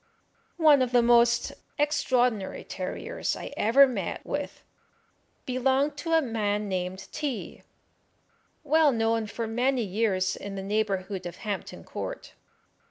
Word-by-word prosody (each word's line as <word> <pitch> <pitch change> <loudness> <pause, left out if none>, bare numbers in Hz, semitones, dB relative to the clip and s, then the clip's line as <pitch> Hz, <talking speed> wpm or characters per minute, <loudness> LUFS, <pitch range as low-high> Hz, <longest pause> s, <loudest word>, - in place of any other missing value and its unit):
One 305 -5 +6
of 250 -1 0
the 240 -1 +5
most 235 0 +4 0.2
extraordinary 250 -8 +1
terriers - - -4
I - - -7
ever 250 +6 +6
met 255 - -4
with - - -4 0.8
belonged 265 +3 +1
to 330 +2 -2
a 325 -1 +4
man 210 -3 -1
named 185 0 -3
T 290 -6 -4
y, - - -31 1.0
well 305 0 +4
known 225 -2 0
for 230 +2 -4
many 245 +3 +1
years 190 -2 0
in 200 -1 -7
the 195 - -5
neighbourhood 195 -2 -2
of 175 - -8
Hampton 205 -2 -4
Court. - - -7
235 Hz, 130 wpm, -27 LUFS, 205-270 Hz, 1.0 s, One